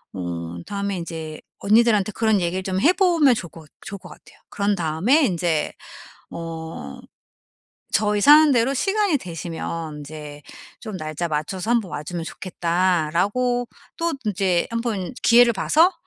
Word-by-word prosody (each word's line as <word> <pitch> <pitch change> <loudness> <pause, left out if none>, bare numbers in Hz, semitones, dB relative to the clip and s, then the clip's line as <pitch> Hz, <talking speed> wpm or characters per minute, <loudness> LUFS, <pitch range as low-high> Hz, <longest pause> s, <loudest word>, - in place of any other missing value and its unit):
음 85 -1 -5
다음에 200 -1 -3
이제 160 -2 -7 0.2
언니들한테 215 -1 +3
그런 220 -2 +2
얘기를 180 +2 -1
좀 185 0 -1
해 335 - +5
보면 340 -8 +4
좋을 180 -6 -6
것 160 -2 -14
좋을 200 0 -8
것 180 -1 -13
같아요. - - -17
그런 205 0 0
다음에 180 - +2
인제 170 -6 0 0.6
뭐 160 - -7 0.9
"저희 210 0 +2
사는 295 +5 +7
데로 250 +2 +2
시간이 390 +3 +1
되시면 165 - -6
인제 150 0 -9 0.4
좀 215 -4 -6
날짜 155 +2 -3
맞춰서 170 +7 -3
한번 230 -7 +1
와 145 - -4
주면 170 +1 -5
좋겠다."라고 185 +8 0 0.3
또 335 0 -1
인제 190 -4 +1
한번 230 -3 -3
기회를 240 0 +6
봐서 320 - +3
190 Hz, 290 characters per minute, -22 LUFS, 165-235 Hz, 0.9 s, 사는